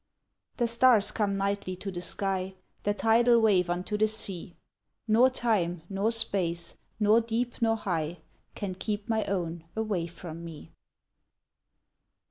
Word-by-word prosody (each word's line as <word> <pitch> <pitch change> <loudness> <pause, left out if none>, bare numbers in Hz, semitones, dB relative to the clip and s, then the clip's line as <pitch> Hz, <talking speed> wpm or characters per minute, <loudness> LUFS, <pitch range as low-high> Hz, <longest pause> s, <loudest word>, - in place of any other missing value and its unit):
The 240 - +1
stars 230 -3 +4
come 205 -3 -1
nightly 195 -1 -2
to 195 +2 -6
the 175 -1 -5
sky; 190 0 -3 0.3
The 205 0 0
tidal 235 +2 +4
wave 195 -5 +3
unto 180 +4 -2
the 215 - +4
sea; 195 -5 -3 0.5
Nor 230 +4 +5
time, 195 -10 -1
nor 200 +3 0
space, 185 -7 +3 0.2
nor 215 +2 +5
deep, 235 +2 -3
nor 225 -1 +3
high, 170 -5 -3 0.4
Can 195 -3 -4
keep 205 +3 -4
my 220 -2 +1
own 170 -4 -3
away 210 -6 -1
from 170 -1 -9
me. 165 -3 -10
200 Hz, 135 wpm, -28 LUFS, 180-225 Hz, 0.5 s, Nor